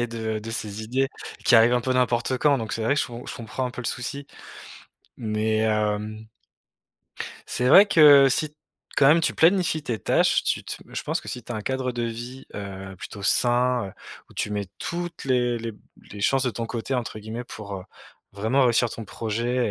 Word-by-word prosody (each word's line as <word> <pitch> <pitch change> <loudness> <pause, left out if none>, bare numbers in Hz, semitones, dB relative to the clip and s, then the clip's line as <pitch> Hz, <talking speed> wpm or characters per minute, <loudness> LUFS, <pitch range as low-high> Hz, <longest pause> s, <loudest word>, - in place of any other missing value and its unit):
et - - 0
de 110 -1 -3
de 115 - -7
ses 110 -1 -4
idées, 130 +5 0 0.4
qui 120 - +5
arrivent 115 +2 +7
un 120 - +2
peu 130 +2 -1
n'importe 125 0 +1
quand, 145 -1 +3
donc 110 -2 -4
c'est 115 - -2
vrai 115 +6 +2
que 145 - +1
je - - 0
com 120 0 -8
je - - -6
comprends 120 +3 -4
un - - -5
peu 125 - -7
le - - -4
souci, 140 +3 -3 0.9
mais 110 -1 -1
hem 110 0 -1 1.2
c'est 125 +1 0
vrai 195 +8 +9
que, 145 -6 +8
si, 150 +3 -1 0.4
quand 135 - +5
même, 160 +4 +6
tu 165 - 0
planifies 170 -2 +3
tes 120 -6 -3
tâches, - - +2
tu - - -1
te - - -5
je - - -5
pense - - -2
que - - -11
si 125 - -5
tu 120 - -7
as - - -4
un 110 - -3
cadre 130 0 -2
de 120 -1 -3
vie, 120 +3 -6
heu, 95 -1 -7
plutôt 100 +2 -9
sain, 120 0 +2
heu, - - -11 0.4
où - - -17
«tu - - -2
mets 100 -2 -3
toutes 175 -2 -5
les 125 -2 +1
les 115 0 -5 0.4
les 105 - -8
chances 135 +5 +2
de 125 - +1
ton 115 +1 -4
côté», 120 +3 -3
entre 120 -3 -3
guillemets, 110 +3 -6
pour, 100 -4 -8
heu, 95 - -7 0.5
vraiment 110 +7 +1
réussir 120 0 +3
ton 115 - -7
projet 115 +3 -1
120 Hz, 215 wpm, -25 LUFS, 110-130 Hz, 1.2 s, vrai